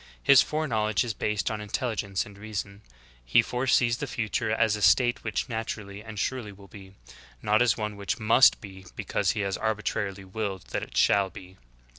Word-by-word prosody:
His 140 Hz, -2 st, +7 dB
foreknowledge 110 Hz, -10 st, 0 dB
is 120 Hz, -2 st, -3 dB
based 105 Hz, -1 st, -1 dB
on 105 Hz, -1 st, -4 dB
intelligence 105 Hz, -3 st, -2 dB
and 100 Hz, -, -13 dB
reason; 100 Hz, -1 st, -6 dB, 0.4 s
He -, -, +4 dB
foresees 125 Hz, -1 st, +1 dB
the 145 Hz, -, -3 dB
future 110 Hz, -3 st, -2 dB
as 110 Hz, -1 st, +2 dB
a 105 Hz, -, -6 dB
state 125 Hz, +3 st, +4 dB
which -, -, -2 dB
naturally 110 Hz, -3 st, -5 dB
and 110 Hz, -2 st, -9 dB
surely 120 Hz, +1 st, -2 dB
will 100 Hz, 0 st, -15 dB
be; 95 Hz, -1 st, -13 dB, 0.5 s
not 105 Hz, +2 st, +3 dB
as 120 Hz, -2 st, +3 dB
one 105 Hz, -1 st, -3 dB
which 100 Hz, -1 st, -3 dB
must 115 Hz, +4 st, +5 dB
be 95 Hz, -2 st, -11 dB
because -, -, 0 dB
He 105 Hz, -, -2 dB
has 100 Hz, -1 st, -2 dB
arbitrarily 105 Hz, -3 st, -2 dB
willed 95 Hz, -1 st, -4 dB
that -, -, -1 dB
it -, -, -7 dB
shall 100 Hz, -1 st, +4 dB
be. 95 Hz, +1 st, -13 dB
105 Hz, 180 wpm, -27 LUFS, 100-115 Hz, 0.5 s, His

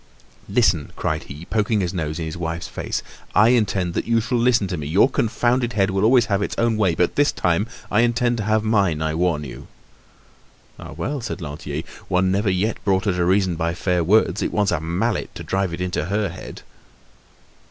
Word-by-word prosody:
"Listen," 100 Hz, -, +2 dB
cried -, -, -2 dB
he, 75 Hz, +5 st, -9 dB
poking 110 Hz, +1 st, 0 dB
his 90 Hz, -3 st, -1 dB
nose 80 Hz, -3 st, -3 dB
in 80 Hz, -, -3 dB
his 80 Hz, +1 st, -5 dB
wife's 85 Hz, 0 st, -4 dB
face; -, -, -4 dB, 0.3 s
"I 105 Hz, +3 st, +6 dB
intend 100 Hz, -7 st, +1 dB
that -, -, -2 dB
you 115 Hz, -1 st, +3 dB
shall 120 Hz, +2 st, -1 dB
listen 120 Hz, -3 st, +3 dB
to 90 Hz, -, -2 dB
me! 75 Hz, -2 st, -5 dB
Your 95 Hz, -, +4 dB
confounded 120 Hz, 0 st, 0 dB
head 100 Hz, -1 st, +2 dB
will 95 Hz, +1 st, 0 dB
always 120 Hz, +1 st, +5 dB
have 100 Hz, -3 st, 0 dB
its -, -, -2 dB
own 115 Hz, -1 st, +2 dB
way. 95 Hz, -6 st, +2 dB
But, 90 Hz, -, +1 dB
this 145 Hz, 0 st, +3 dB
time, 90 Hz, +5 st, 0 dB, 0.2 s
I 105 Hz, -, +3 dB
intend 120 Hz, 0 st, +1 dB
to 110 Hz, -, -2 dB
have 110 Hz, 0 st, +2 dB
mine, 100 Hz, -8 st, +1 dB
I 80 Hz, 0 st, -1 dB
warn 80 Hz, -2 st, 0 dB
you!" 65 Hz, -4 st, -9 dB, 1.1 s
"Ah! -, -, -9 dB
well," 140 Hz, +4 st, -3 dB
said 115 Hz, -3 st, -5 dB
Lantier, 75 Hz, -1 st, -5 dB, 0.2 s
"one 95 Hz, +1 st, +2 dB
never 100 Hz, +2 st, +1 dB
yet 95 Hz, +4 st, -1 dB
brought 95 Hz, 0 st, +1 dB
her 100 Hz, -, +2 dB
to 90 Hz, -1 st, 0 dB
reason 95 Hz, -1 st, +2 dB
by 85 Hz, 0 st, -1 dB
fair 90 Hz, -1 st, 0 dB
words; 105 Hz, +2 st, +3 dB
it -, -, -1 dB
wants 105 Hz, -2 st, +1 dB
a 90 Hz, -, 0 dB
mallet 90 Hz, +8 st, -2 dB
to -, -, -7 dB
drive 95 Hz, -1 st, -1 dB
it 85 Hz, -, -5 dB
into 90 Hz, -4 st, -1 dB
her 100 Hz, +2 st, -1 dB
head." 90 Hz, +2 st, -9 dB
95 Hz, 210 wpm, -22 LUFS, 85-110 Hz, 1.1 s, I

